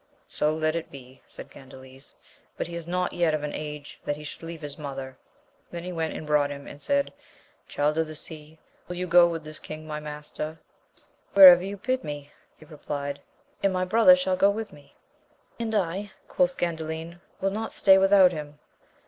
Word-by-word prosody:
So 150 - 0
let 155 0 0
it 170 - -4
be, 130 -1 -13
said - - -11
Gandales, 130 0 -14 0.4
but - - -2
he 170 - -9
is 170 -1 -6
not 180 +1 -1
yet 170 -3 +2
of 150 - -4
an 150 - -4
age 150 -1 -7
that 145 - -2
he 150 - -10
should 150 - -9
leave 165 -1 -8
his 145 -1 -6
mother: 135 -3 -7 0.5
then 170 -1 -7
he 180 - -5
went 160 -2 -3
and - - -6
brought 150 -1 +2
him, 140 0 -8
and 145 - -11
said. 280 0 0 0.5
Child 150 +2 0
of 160 - +1
the 155 - -8
Sea, 155 0 -9 0.3
will 180 - -5
you 180 +1 -3
go 175 0 +6
with 165 -2 -4
the 155 0 -9
king 155 0 -8
my 150 -1 -5
master? 150 +1 -6 0.8
Wherever 180 -3 +10
you 200 +1 -5
bid 255 +5 -1
me, 145 -1 -7 0.3
he 155 - -16
replied, 145 -2 -5 0.4
and 195 - +2
my 185 0 0
brother 230 +8 +7
shall 275 -9 0
go 195 +2 +4
with 215 +1 -4
me. 145 -1 -18 0.6
And 225 -1 -2
I, 195 +1 -1 0.2
quoth 180 0 +1
Gandalin, 165 0 -4 0.2
will 195 0 0
not 220 +2 -4
stay 190 -1 +5
without 195 -1 +6
him. 150 -3 -7
160 Hz, 195 wpm, -26 LUFS, 150-180 Hz, 0.8 s, Wherever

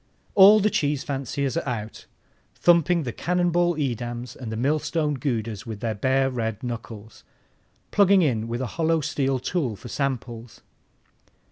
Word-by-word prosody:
All 205 +2 +8
the 210 +1 +2
cheese 145 -3 0
fanciers 135 -1 -3
are - - -2
out, 110 -3 -6 0.5
thumping 170 0 +3
the 125 - -3
cannon 175 +6 0
ball 175 0 +2
Edams 120 -4 -4
and 120 -4 -7
the 110 - -4
millstone 150 +4 0
Goudas 115 -5 -3
with 110 -2 -6
their 115 0 -2
bare 130 +5 +1
red 115 -3 -3
knuckles, 115 -3 -7 0.7
plugging 200 -2 +5
in 115 -7 0
with 120 +2 -3
a - - -1 0.2
hollow 160 0 +2
steel 135 -1 0
tool 130 - -2
for 110 +5 -11
samples. 120 -4 -4
130 Hz, 150 wpm, -24 LUFS, 115-160 Hz, 0.7 s, All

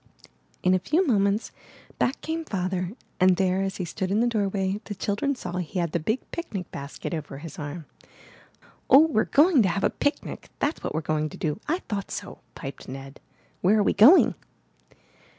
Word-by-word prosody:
In 185 - +4
a 185 - +3
few 315 - +1
moments 205 - +1 0.5
back 260 - 0
came 325 +1 -3
Father, 185 - -2 0.3
and 185 0 +5
there, 185 0 +1
as 195 -1 -2
he 180 - -3
stood 185 +2 -3
in 200 +3 +2
the 235 - +3
doorway, 200 -3 0
the 205 - -5
children 205 +9 -1
saw 180 -7 -5
he 180 +1 -4
had 170 -3 0
the 170 - 0
big 220 +11 -1
picnic 205 - -5
basket 140 +5 -6
over 150 -4 -5
his 155 +1 -9
arm. 150 +2 -6 1.0
*'0h, 305 +4 +8
we're 215 - +2
going 300 -1 +5
to 195 - +3
have 185 +3 -1
a - - +3
picnic, 285 - -3
that's 290 +3 -1
what - - -3
we're 160 - 0
going 155 0 -1
to - - -10
do! 150 +1 -2
I 340 +5 -1
thought 200 -2 -3
so!'' - - -6 0.2
piped 135 -2 -8
Ned. 135 +1 -8 0.2
* - - -36
Where 200 +4 +4
are 210 - +4
we - - +2
going?" 280 - +7
195 Hz, 195 wpm, -26 LUFS, 170-230 Hz, 1.0 s, 0h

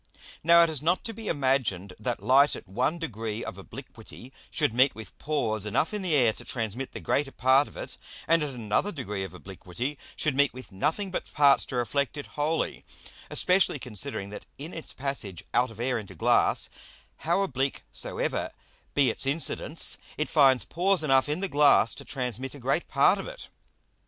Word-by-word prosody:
Now 170 +1 +7
it 165 - +2
is 150 -4 -3
not 175 +4 +1
to 225 - -5
be 220 0 -8
imagined 130 - 0
that 120 +2 -3
Light 140 +3 +5
at - - -10
one 125 - 0
degree 115 -8 -4
of - - -7
obliquity 130 +2 -11 0.2
should 150 -8 0
meet 130 +3 +4
with 110 -1 -10
Pores 110 -9 -1
enough 140 - 0
in 210 - -2
the 180 -5 +2
Air 120 -6 +4
to - - -11
transmit 115 +2 -4
the - - -6
greater 140 -1 0
part 130 +3 +4
of - - -14
it, - - -7 0.3
and 165 0 +4
at 150 - -1
another 115 - 0
degree 105 - -4
of 95 -2 -8
obliquity 95 +9 -6 0.2
should 150 -4 0
meet 140 -2 +3
with 130 -3 -10
nothing 160 - -1
but - - -4
parts 140 -2 +5
to - - -6
reflect 130 +4 -1
it 145 - -5
wholly, 155 +2 -1 0.5
especially 180 -4 +3
considering 105 -5 -4
that 105 - -9
in 155 +5 -7
its 160 - -6
passage 130 - -3
out 125 0 +3
of 115 -1 -13
Air 125 0 0
into 105 - -10
Glass, - - +2 0.5
how 170 +5 +1
oblique 135 -6 -2
soever - - -2 0.5
be 135 -5 +4
its 135 - -1
Incidence, 155 +2 +1 0.2
it 155 - -1
finds 135 -6 +4
Pores 180 +1 +1
enough 135 -1 +3
in 155 +5 -1
the 195 - 0
Glass 145 -7 +4
to - - -9
transmit 130 0 -4
a - - -10
great 135 +7 0
part - - +4
of - - -6
it. - - -9
135 Hz, 190 wpm, -27 LUFS, 115-155 Hz, 0.5 s, Now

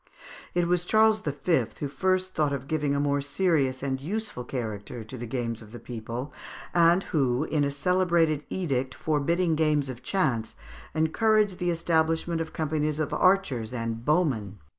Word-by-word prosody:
It 175 -1 +2
was 175 0 +2
Charles 220 +2 +4
V. 145 - +1
who 145 - -2
first 185 +5 0
thought 150 -2 +1
of 135 -1 -4
giving 150 -2 0
a - - +1
more 145 0 +1
serious 140 -4 +1
and 135 -1 -2
useful 205 - -4
character 115 -2 -5
to 110 +4 -8
the 120 -1 -6
games 115 -1 -3
of 110 -1 -13
the 120 - -8
people, 120 +4 -6 0.4
and 170 +2 +5
who, 135 -4 +1
in 155 -2 0
a 140 - +1
celebrated 165 0 +2
edict 135 -8 -1
forbidding 165 +3 +1
games 150 -3 +1
of 125 -1 -7
chance, 130 - 0 0.4
encouraged 205 +4 +2
the 175 -1 0
establishment 165 0 +1
of 160 - -5
companies 155 -1 -1
of 155 - -1
archers 140 - +2
and 115 -1 -3
bowmen. 130 - +1
150 Hz, 160 wpm, -27 LUFS, 130-175 Hz, 0.4 s, and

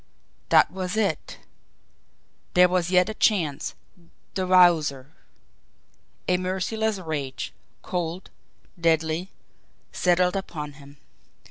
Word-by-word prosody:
That - - +5
was 185 +2 -4
it! 200 -8 -1 1.2
There 180 0 +7
was 180 -1 0
yet 180 0 +4
a 220 - -3
chance 170 -11 0 0.6
the 185 -1 -2
Wowzer! 160 -7 +4 1.2
A 180 - +3
merciless 195 +4 -1
rage, 150 -7 -4 0.3
cold, 175 0 -4 0.5
deadly, 165 +2 +1 0.6
settled 180 0 +2
upon 155 -6 -5
him. 140 0 -15
180 Hz, 95 wpm, -25 LUFS, 160-185 Hz, 1.2 s, There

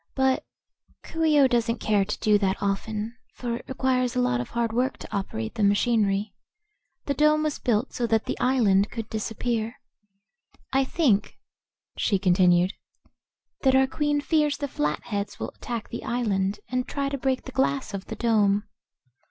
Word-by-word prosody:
But 265 -1 +2 0.6
Coo 325 0 -3
ee 305 -2 +4
oh 275 - +7
doesn't 235 -1 +1
care 205 -2 +2
to 210 - -4
do 210 -2 +4
that 195 -1 +1
often, 210 +3 -2 0.2
for 235 -2 -3
it - - -12
requires 255 -1 0
a - - +1
lot 125 - +1
of 125 - -7
hard 235 -1 -1
work 255 +3 0
to - - -8
operate 110 - -3
the - - -4
machinery. 205 -1 +2 0.7
The 280 - 0
dome 305 +1 +3
was 305 -2 -2
built 235 +1 0
so 240 - -1
that 225 -1 +1
the - - -2
island 215 -6 +3
could 225 -2 -5
disappear. 225 +1 -2 0.9
I 270 0 +3
think," 260 - +1 0.6
she 200 - +2
continued, 180 0 +3 0.9
"that 265 -1 +4
our 265 0 +5
Queen 295 +1 0
fears 300 -1 +1
the 285 - -3
Flatheads 200 - -3
will - - -4
attack 235 -3 -6
the 235 - -6
island 205 -5 -1
and 255 +1 -1
try 280 -1 -2
to 275 - -2
break 260 0 0
the 260 - -7
glass 265 -3 0
of 195 -1 -5
the - - -6
dome." 210 -3 +2
235 Hz, 170 wpm, -26 LUFS, 205-265 Hz, 0.9 s, oh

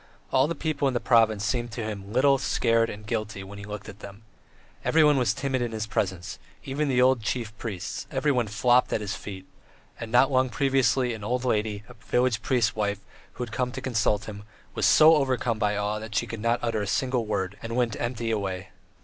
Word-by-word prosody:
All 130 +2 +4
the 170 - -3
people 150 -2 -1
in 130 - -1
the - - +2
province 110 -4 +3
seemed 120 -1 -1
to 115 - -4
him 105 -2 -6
little, 135 +3 +4
scared, 115 -3 +2
and 105 +1 -8
guilty 105 -3 -3
when 100 +1 -10
he 100 - -8
looked 105 0 -7
at 105 -2 -10
them. 100 +1 -11 0.6
Everyone 150 -2 +4
was 125 -5 +2
timid 130 +3 -2
in 120 -2 -2
his 110 -1 -2
presence, 95 -2 -3 0.2
even 145 +2 -2
the 130 -2 +1
old 130 -1 +4
chief 110 0 -3
priests; 95 -6 -5
everyone 135 -4 +1
"flopped" 120 +4 +3
at - - 0
his 100 -2 -3
feet, 95 -2 -8 0.5
and 115 -1 -6
not 130 +3 +5
long 130 0 +2
previously 130 0 +2
an 110 -2 -8
old 125 +4 -1
lady, 105 -3 0
a 125 - -12
village 125 -1 0
priest's 115 -2 +1
wife 100 -2 -1 0.3
who - - -5
had 110 -3 -8
come 125 -1 -1
to 130 - -4
consult 110 -5 0
him, 100 -1 -8 0.3
was - - +2
so 155 +1 +7
overcome 125 -5 0
by 105 0 +1
awe 105 +1 -1
that 110 0 -8
she - - +1
could 115 -2 -7
not 115 +2 +2
utter 115 -3 0
a 100 - -3
single 120 +2 0
word, 95 -2 -2
and 115 0 -5
went 120 -3 +1
empty 120 -1 -2
away. 95 -3 -3
115 Hz, 215 wpm, -26 LUFS, 105-130 Hz, 0.6 s, so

